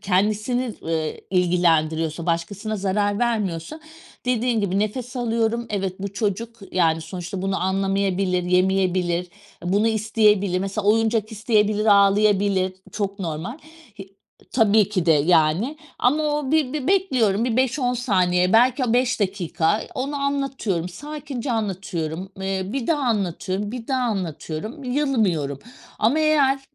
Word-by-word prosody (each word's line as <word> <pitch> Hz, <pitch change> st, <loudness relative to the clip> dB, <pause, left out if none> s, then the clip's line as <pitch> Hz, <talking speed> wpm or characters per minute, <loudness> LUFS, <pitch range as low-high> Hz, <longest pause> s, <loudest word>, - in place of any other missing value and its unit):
kendisini, 215 Hz, +5 st, 0 dB
ııı, 160 Hz, -1 st, -1 dB, 0.2 s
ilgilendiriyorsa 165 Hz, -3 st, +1 dB
başkasına 200 Hz, +6 st, -2 dB
zarar 205 Hz, +1 st, 0 dB
vermiyorsa 215 Hz, -, -2 dB, 0.5 s
dediğin 240 Hz, -2 st, +1 dB
gibi 195 Hz, -1 st, 0 dB
nefes 240 Hz, +5 st, -3 dB
alıyorum. 235 Hz, -1 st, 0 dB
Evet, 195 Hz, -2 st, -1 dB
bu 200 Hz, 0 st, -5 dB
çocuk 225 Hz, +2 st, -2 dB, 0.2 s
yani 165 Hz, -3 st, +2 dB
sonuçta 180 Hz, +3 st, -6 dB
bunu 195 Hz, 0 st, -1 dB
anlamayabilir, 195 Hz, -1 st, 0 dB
yemeyebilir. 180 Hz, -1 st, +1 dB, 0.4 s
Bunu 200 Hz, +5 st, +2 dB
isteyebilir 210 Hz, -3 st, +2 dB
mesela 195 Hz, +2 st, -3 dB
oyuncak 220 Hz, 0 st, +2 dB
isteyebilir 215 Hz, -1 st, +1 dB
ağlayabilir, 200 Hz, -2 st, +4 dB, 0.2 s
çok 200 Hz, -1 st, -3 dB
normal. 170 Hz, -, -4 dB, 0.4 s
Y 195 Hz, -, -8 dB, 0.5 s
tabii 220 Hz, -4 st, +4 dB
ki 185 Hz, -5 st, -1 dB
de 165 Hz, -, +6 dB
yani 160 Hz, -, +2 dB, 0.2 s
ama 290 Hz, +5 st, +2 dB
o 295 Hz, -2 st, -1 dB
bir 300 Hz, -5 st, +2 dB
bir 295 Hz, -3 st, -3 dB
bekliyorum 255 Hz, -, +2 dB
bir 240 Hz, -1 st, 0 dB
5-10 255 Hz, -1 st, +1 dB
saniye 185 Hz, -6 st, +2 dB
belki 250 Hz, +3 st, +4 dB
o 225 Hz, -, 0 dB
5 250 Hz, -1 st, +1 dB
dakika, 185 Hz, 0 st, 0 dB
eee, -, -, -8 dB
onu 275 Hz, +3 st, -3 dB
anlatıyorum 275 Hz, -11 st, -1 dB
sakince 280 Hz, +3 st, -5 dB
anlatıyorum, 190 Hz, -4 st, -3 dB
eee, 190 Hz, 0 st, -1 dB
bir 245 Hz, +4 st, -3 dB
daha 315 Hz, -3 st, +1 dB
anlatıyorum, 200 Hz, -1 st, -1 dB
bir 240 Hz, -2 st, -6 dB
daha 260 Hz, -2 st, +1 dB
anlatıyorum 195 Hz, -, -4 dB
yılmıyorum 220 Hz, -, 0 dB, 0.4 s
ama 250 Hz, +9 st, +2 dB
eğer... 290 Hz, -3 st, +3 dB
205 Hz, 130 wpm, -23 LUFS, 185-240 Hz, 0.5 s, de